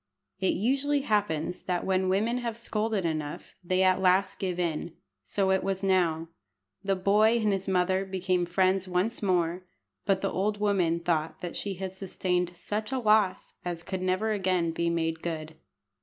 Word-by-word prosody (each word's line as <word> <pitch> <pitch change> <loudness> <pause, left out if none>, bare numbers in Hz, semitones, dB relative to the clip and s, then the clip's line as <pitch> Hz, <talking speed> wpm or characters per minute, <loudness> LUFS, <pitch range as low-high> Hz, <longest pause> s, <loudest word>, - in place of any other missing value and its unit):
It 190 - +1
usually 275 +6 +1
happens 200 - 0
that 180 -2 -2
when 190 0 +1
women 220 +6 +1
have 235 -2 -3
scolded 215 -4 -1
enough 155 -2 -3
they 185 +2 +2
at 185 0 +3
last 190 +1 +3
give 180 -2 -2
in. 170 -1 -2 0.3
So 190 - 0
it 190 - +2
was 195 0 -2
now. 170 -4 +2 0.5
The 195 0 +1
boy 210 +5 +4
and 215 -3 +2
his 195 0 -3
mother 185 0 +2
became 185 -2 -1
friends 185 +1 +2
once 185 +6 0
more; 180 -3 +1 0.5
but 195 -1 +2
the 195 - 0
old 205 +2 0
woman 180 -5 +1
thought 170 +1 -2
she 200 -1 -3
had 190 0 -5
sustained 180 -2 -2
such 210 +6 -3
a 265 - 0
loss 215 -5 +2
as 175 -1 -4
could 185 +1 -4
never 185 +4 +1
again 185 -5 +1
be 170 +1 0
made 165 -1 -1
good. 160 -2 -4
185 Hz, 170 wpm, -28 LUFS, 175-200 Hz, 0.5 s, boy